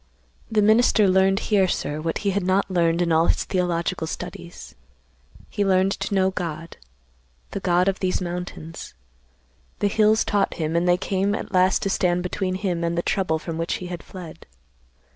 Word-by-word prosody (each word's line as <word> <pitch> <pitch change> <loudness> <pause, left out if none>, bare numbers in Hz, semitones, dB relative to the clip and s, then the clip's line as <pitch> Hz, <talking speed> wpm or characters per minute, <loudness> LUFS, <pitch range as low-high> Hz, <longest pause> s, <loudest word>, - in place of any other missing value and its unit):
The 215 -1 +3
minister 220 -1 +4
learned 190 +1 +3
here, 195 -3 +4
sir, 150 -3 -2
what 165 0 -2
he 200 - +3
had 200 +1 0
not 190 +1 +1
learned 170 -1 +2
in 170 - -1
all 160 +1 +3
his - - +1
theological 175 -2 -1
studies. 175 +1 -8 0.7
He 205 - -2
learned 190 0 +3
to 200 - -2
know 190 0 +3
God, 165 -3 -5 0.7
the - - -3
God 180 +1 +2
of 195 0 0
these 185 -1 0
mountains. 175 - -6 0.8
The 205 - +1
hills 215 +1 +3
taught 200 -2 0
him, 160 -1 -2
and 175 +1 +2
they 175 - +4
came 195 +2 0
at - - -6
last 185 +1 +3
to 195 - 0
stand 180 -1 +1
between 185 0 -2
him 185 -3 -2
and 170 0 -1
the 170 - 0
trouble 180 -5 0
from 160 +1 -6
which 165 - -1
he 180 - -6
had 175 -1 -6
fled. 175 -4 -11
180 Hz, 180 wpm, -23 LUFS, 170-195 Hz, 0.8 s, minister